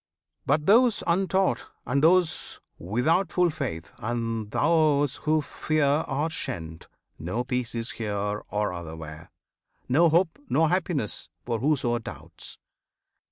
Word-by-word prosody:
But 150 0 +2
those 230 +3 +5
untaught, 190 +2 +1 0.2
And 140 +3 0
those 175 0 +2 0.2
without 135 - +1
full 180 -2 +3
faith, 130 - -5
and 115 -1 -2
those 145 -1 +2
who 155 0 +1
fear 155 +1 0 0.2
Are 145 +4 -1
shent; 80 - -5 0.3
no 95 +10 -2
peace 125 -2 -2
is 115 0 -3
here 105 -1 -2
or 105 -2 -1
other 85 -2 -6
where, 80 -1 -9 0.6
No 165 +7 +5
hope, 170 +1 +2
nor 155 +5 +3
happiness 165 - -1 0.2
for 115 -2 -1
whoso 125 -3 +1
doubts. 110 - -9
135 Hz, 125 wpm, -26 LUFS, 110-160 Hz, 0.6 s, those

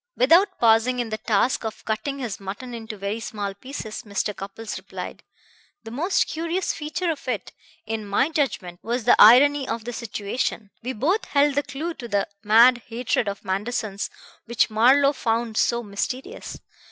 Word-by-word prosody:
Without 355 +9 +4
pausing 230 +2 +4
in 240 -2 -2
the 215 - -3
task 225 +4 +1
of 220 -1 -6
cutting 220 +6 -2
his 240 -7 -4
mutton 205 +6 -7
into 225 -2 -7
very 200 +3 -3
small 205 -3 -4
pieces 220 0 -7
Mr. 205 0 -3
Cupples 205 +3 -7
replied: - - -8 0.6
"The 225 - -9
most 335 - +1
curious 335 +3 -2
feature 330 +3 -2
of 295 -4 -7
it, 235 -5 -3 0.3
in 220 -1 -4
my 205 +9 +2
judgment, 195 - -2
was 240 +1 -2
the 245 - +6
irony 270 +5 +7
of 230 -1 -3
the 245 - -4
situation. 215 -1 -3
We 250 +2 -4
both 330 - 0
held 285 0 +3
the 285 - +2
clue 290 +5 -5
to 250 -6 -8
that 200 -2 -1
mad 235 +4 +6
hatred 235 -1 -1
of 200 0 -5
Manderson's 200 +1 -2 0.4
which 235 -1 +1
Marlowe 270 +6 +5
found 230 -3 -1
so 235 +2 +1
mysterious. 250 - -5
235 Hz, 165 wpm, -24 LUFS, 215-275 Hz, 0.6 s, irony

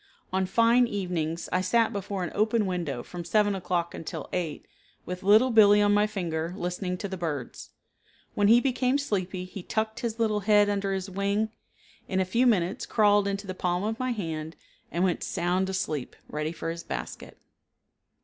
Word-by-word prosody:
On 190 0 +1
fine 235 +4 +4
evenings 175 -6 -2
I 185 - +2
sat 220 +5 +2
before 200 -1 -3
an 175 - -4
open 215 +1 +2
window 170 -9 -3
from 175 -1 -7
7 205 +4 +2
o'clock 175 -2 -2
until 160 -2 -6
8 170 -5 -3 0.4
with 180 +1 -5
Little 215 +6 +5
Billee 210 -2 +7
on 205 0 +4
my 205 +1 +4
finger 170 -4 -3
listening 180 0 -3
to 200 - -4
the 190 -1 -5
birds. 150 -8 -5 0.6
When 205 -1 +2
he 230 +3 +7
became 255 +1 +1
sleepy 190 -8 -2
he 185 +1 -8
tucked 220 +4 -2
his 230 -2 -3
little 215 -2 +1
head 205 0 +4
under 200 -1 -1
his 190 0 -2
wing, 200 +3 0 0.6
in 190 - 0
a 190 - +2
few 235 +7 +2
minutes 190 -4 +1
crawled 205 -2 +4
into 200 +1 -3
the 185 - -4
palm 180 0 -1
of 220 +2 -2
my 255 0 -1
hand 160 -7 -4 0.4
and 175 - 0
went 185 -2 0
sound 180 +2 0
asleep, 155 -8 -3
ready 150 +1 -3
for 165 0 -4
his 170 0 -6
basket. - - -6
190 Hz, 180 wpm, -27 LUFS, 175-210 Hz, 0.6 s, Billee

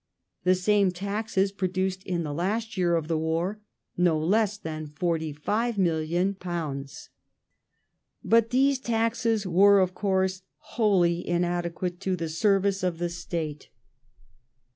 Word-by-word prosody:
The 185 0 +5
same 200 +1 +3
taxes 200 +1 -1
produced 185 -1 -2
in 175 -2 -1
the 150 -2 -4
last 220 +8 -2
year 175 -3 +2
of 160 -2 -1
war 165 +5 -1 0.4
no 175 -3 +3
less 200 +6 +1
than 155 -5 -6
£45,000,000. 170 - -2 1.1
But 230 0 +3
those 270 +2 +3
taxes 230 -2 0
were, 195 +3 +5
of 185 -1 +1
course, 190 -1 0 0.3
wholly 180 -6 +2
inadequate 175 0 -1
to 190 -1 -1
the 165 -2 -4
service 195 +3 +1
of 180 -2 -1
the 175 +1 -2
State. 165 -3 -5
185 Hz, 115 wpm, -26 LUFS, 170-200 Hz, 1.1 s, The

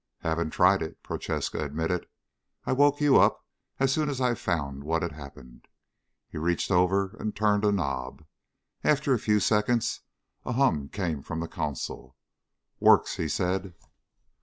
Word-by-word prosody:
"Haven't 80 0 -1
tried 90 +3 +4
it," 80 - -6
Prochaska - - -3
admitted. 80 +5 -2 0.6
"I - - -1
woke 145 +2 +3
you 145 -2 +5
up - - +3 0.3
as 135 -1 +3
soon 155 0 0
as 135 -2 -3
I 125 -2 +2
found 70 -10 -3
what 80 +3 -1
had 85 - -2
happened." 70 -4 -13 0.6
He - - -7
reached 85 +4 -1
over 95 +3 +2
and 105 -1 -3
turned 105 -1 +2
a 105 - +4
knob. 70 -5 -3 0.6
After 145 -2 +2
a 120 - +1
few 105 0 +2
seconds 105 +3 +1 0.4
a - - -3
hum 80 - +1
came 85 -8 -3
from 80 - -5
the 85 - -3
console. 65 -3 -5 0.6
"Works," - - +4
he 80 - -1
said. 90 +2 -1
90 Hz, 155 wpm, -27 LUFS, 75-110 Hz, 0.6 s, you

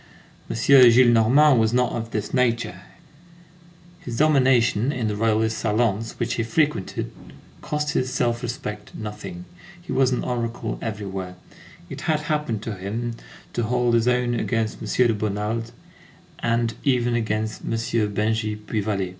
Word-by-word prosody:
M. - - -3
Gillenormand 125 +2 +6
was 110 +1 +2
not 125 0 +2
of 115 -1 -4
this 105 -2 -4
nature; 120 -7 0 1.2
his 125 -10 -6
domination 130 -5 +3
in 120 -5 -2
the 105 - -1
Royalist 110 +1 +1
salons 115 0 0
which 120 +1 -2
he 115 - -1
frequented 130 -3 -1 0.5
cost 150 0 -2
his 130 -2 -1
self 120 -2 0
respect 110 -4 -6
nothing. 110 - -7 0.3
He 175 - -9
was 135 -1 +3
an 125 - -1
oracle 120 -1 -3
everywhere. 95 -4 -5 0.5
It - - -8
had 155 -2 0
happened 150 -8 -2
to 110 - -4
him 115 +5 -4 0.4
to - - -1
hold 120 +1 +1
his 115 0 +3
own 125 -1 +2
against 115 -2 -1
M. 110 - -5 0.2
de 115 - +2
Bonald, 110 +2 -2 0.7
and 115 0 0
even 120 -3 +2
against 110 -2 -2
M. - - -6
Bengy 110 -1 0
Puy 105 0 -3
Vallée. 100 -3 -1
115 Hz, 145 wpm, -23 LUFS, 110-125 Hz, 1.2 s, Gillenormand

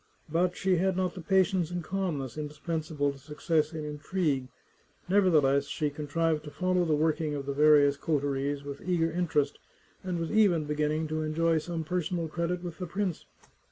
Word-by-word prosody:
But 175 +2 +1
she 185 -1 +2
had 190 +1 +1
not 185 -1 0
the 180 - -8
patience 190 -1 +2
and 175 -1 -4
calmness 155 -9 -3
indispensable 150 -1 -2
to 140 - -12
success 150 +2 0
in 155 -2 -5
intrigue; 150 -2 -1 0.6
nevertheless, 155 -8 +4
she 150 0 -1
contrived 155 +2 -1
to - - -6
follow 180 +3 +1
the 155 -2 +2
work 155 +2 +1
ing 150 -2 -1
of 140 -1 -4
the 140 - -2
various 145 -1 +5
coteries 140 -1 -1
with 140 0 -7
eager 170 -2 +1
interest, 160 -4 0 0.4
and 180 -2 -2
was 165 -1 -3
even 200 -7 +4
beginning 150 +1 0
to 155 0 -1
enjoy 160 +1 +1
some 165 +1 -4
personal 175 0 -2
credit 170 +2 -2
with 175 0 -7
the 180 - -4
prince. 185 -1 -3
160 Hz, 175 wpm, -29 LUFS, 150-180 Hz, 0.6 s, various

